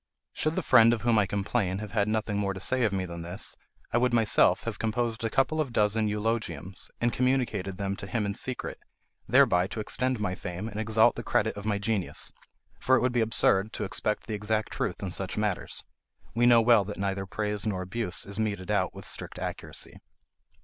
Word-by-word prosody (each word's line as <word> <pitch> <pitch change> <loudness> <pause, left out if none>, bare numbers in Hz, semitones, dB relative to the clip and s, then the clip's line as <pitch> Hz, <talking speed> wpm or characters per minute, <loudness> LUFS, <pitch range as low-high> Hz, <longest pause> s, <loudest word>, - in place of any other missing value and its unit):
Should 155 +1 0
the - - -1
friend 115 -2 +6
of 110 -3 -3
whom 120 -2 +4
I 100 - +2
complain 100 -1 -1
have 105 0 -6
had 105 -2 +1
nothing 110 -1 -1
more 100 -1 -1
to - - -6
say 130 +6 0
of 105 - +1
me 95 -1 -1
than 85 -1 -7
this, 90 +4 -5 0.4
I 120 - +4
would 125 -1 +2
myself 115 -4 +4
have - - -4
composed 115 +1 -1
a 115 - 0
couple 155 +6 +1
of 140 -5 -3
dozen 110 0 +2
of - - +1
eulogiums, 105 -4 -3
and 120 0 +1
communicated 125 -7 0
them 100 -1 -2
to 100 - -7
him 105 +3 -1
in 100 - -1
secret, 125 +4 -4 0.5
thereby 110 -7 +4
to 110 - -6
extend 125 +3 -1
my 100 -3 -1
fame 90 +3 -5
and 110 -1 -5
exalt 110 0 +4
the - - -3
credit - - +1
of 100 0 -7
my 105 -2 +1
genius; 105 -2 -1 0.5
for 130 - +4
it - - +2
would 125 -1 +1
be 120 - +2
absurd 110 -2 +3
to - - -3
expect 105 +1 -2
the 110 - -5
exact 110 +1 -1
truth - - -3
in 95 - -3
such 95 +2 -1
matters. 105 -3 -2 0.5
We 120 +1 +3
know 120 -1 +7
well 115 -3 +6
that 105 +1 -6
neither 95 -1 -2
praise 105 +1 -3
nor 95 -3 -1
abuse 95 -2 -2
is 100 +2 -6
meted 100 -4 -2
out - - 0
with - - -8
strict - - -4
accuracy. - - -5
105 Hz, 215 wpm, -28 LUFS, 100-115 Hz, 0.5 s, know